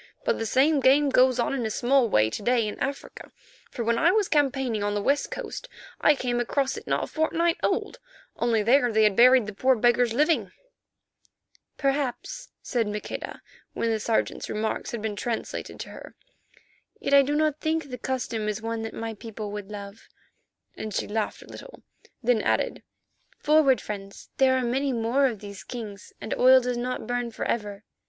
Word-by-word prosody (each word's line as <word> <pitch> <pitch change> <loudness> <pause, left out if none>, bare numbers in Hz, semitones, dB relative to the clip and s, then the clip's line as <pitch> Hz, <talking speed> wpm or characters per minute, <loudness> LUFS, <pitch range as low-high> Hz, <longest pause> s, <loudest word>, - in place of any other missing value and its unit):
But - - +1
the 225 - -2
same 285 +6 +3
game 275 +2 +4
goes 255 -1 +4
on 245 - 0
in 265 -3 -1
a 220 - -1
small 245 +2 +2
way 110 - +3
to - - -4
day 235 0 +2
in 210 - -6
Africa, 280 +1 -5 0.4
for 240 - -4
when 230 0 +1
I 335 - +5
was 415 0 +2
campaigning 265 -7 +1
on 205 0 -1
the 205 - 0
West 280 +4 +1
Coast - - -6 0.3
I 300 - +5
came 245 -2 -1
across 265 +3 0
it - - -9
not - - 0
a - - -1
fortnight 330 +2 0
old, - - -1 0.4
only 230 -3 +1
there 245 +2 +4
they 220 0 +3
had 210 -2 +4
buried 250 +1 +6
the 210 - -6
poor 260 +6 +3
beggars 240 +1 +3
living." 245 - +1 1.2
"Perhaps," 275 - -2
said 235 -3 -1
Maqueda, 210 0 -6 0.3
when 230 - -1
the 220 - 0
Sergeant's 220 +1 -1
remarks 220 +1 -2
had 230 -3 -5
been 215 -2 -2
translated 225 +2 -4
to - - -7
her. - - -11 0.8
"Yet 280 - -2
I 280 - +9
do 285 +2 -1
not 305 -1 +1
think 315 -3 -1
the 250 - -6
custom 235 -4 -2
is 210 0 -3
one 225 0 -3
that 225 0 -6
my 225 0 -4
people 215 -1 -7
would 205 -1 -6
love," 200 0 -9 0.7
and 215 - -6
she - - -1
laughed 215 0 -3
a - - -18
little, - - -12 0.4
then 235 -2 +3
added, - - 0 0.6
"forward, 295 -4 +4
friends, 200 -1 -8
there 260 -1 +4
are 255 - 0
many 265 +3 0
more 240 +4 +2
of 225 -6 -5
these 200 -2 -9
kings 215 -5 -8
and - - -4
oil 260 +1 +6
does 250 0 -2
not 250 +1 -3
burn 245 -1 -2
for 225 - -5
ever." 210 -2 -3
240 Hz, 190 wpm, -26 LUFS, 220-270 Hz, 1.2 s, I